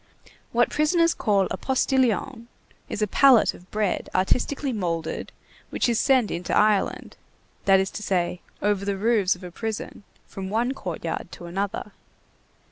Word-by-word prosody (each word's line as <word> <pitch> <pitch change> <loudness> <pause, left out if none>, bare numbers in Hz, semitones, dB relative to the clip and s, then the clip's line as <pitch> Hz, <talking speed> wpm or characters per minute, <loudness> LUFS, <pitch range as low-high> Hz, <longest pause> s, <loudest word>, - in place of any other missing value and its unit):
What 240 +1 +2
prisoners 335 +3 +3
call 200 -3 +1
a - - -2
"postilion" 260 -2 0 0.4
is 210 - -2
a - - +1
pallet 260 +2 +5
of 180 - -16
bread 210 -3 -1
artistically 255 +8 0
moulded, 165 -6 -3 0.4
which - - 0
is 235 -2 +1
sent 260 -5 +3
into 175 +1 -1
Ireland, 210 -2 +1 0.5
that 195 -1 +6
is 190 0 -1
to - - -6
say, 180 -3 -1 0.2
over 205 -1 +1
the 200 -1 -1
roofs 210 -3 +2
of 180 - -15
a 180 - -7
prison, 220 +3 -5 0.2
from 190 -1 -7
one 230 +5 0
courtyard - - -5
to 175 - -9
another. 195 +4 -3
210 Hz, 150 wpm, -25 LUFS, 190-245 Hz, 0.5 s, that